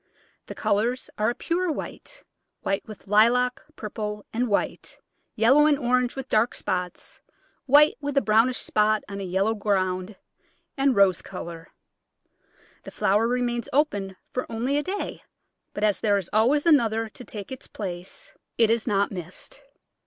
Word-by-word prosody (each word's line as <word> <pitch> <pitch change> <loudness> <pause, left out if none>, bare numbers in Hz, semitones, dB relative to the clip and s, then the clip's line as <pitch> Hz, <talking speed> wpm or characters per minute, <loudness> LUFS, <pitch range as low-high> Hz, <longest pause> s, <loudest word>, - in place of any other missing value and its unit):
The - - -7
colours 235 +5 0
are 215 +2 +3
a 240 - -2
pure 350 0 -1
white, - - -7 0.4
white 195 0 -1
with 215 -2 -11
lilac, 240 +5 +3
purple 210 -1 -5
and 245 +2 0
white, 205 - -2 0.4
yellow 265 +7 +5
and 295 -2 +3
orange 250 -2 +1
with 270 -1 -5
dark 220 +1 +2
spots, 180 -1 -4 0.5
white 295 +3 +6
with 285 -1 -3
a - - +6
brownish 225 +4 +3
spot 215 0 +1
on 200 -1 -6
a - - -4
yellow 190 +4 +1
ground, 190 -2 -1 0.6
and 275 -2 +2
rose 195 -3 +4
colour. 165 0 -8 1.2
The - - -8
flower 210 +4 +2
remains 240 -1 -1
open 205 -10 0 0.2
for 255 - -3
only 240 +5 -1
a - - 0
day, 380 +6 -4 0.5
but 205 - -5
as 205 -3 +2
there 205 -1 +2
is 190 -3 -4
always 255 +8 +3
another 225 -8 +3
to 250 - -11
take 210 -2 -8
its 260 - -8
place 190 - -7 0.2
it 225 -1 +4
is 230 0 0
not 200 -2 +1
missed. 185 - -7
225 Hz, 155 wpm, -25 LUFS, 200-255 Hz, 1.2 s, white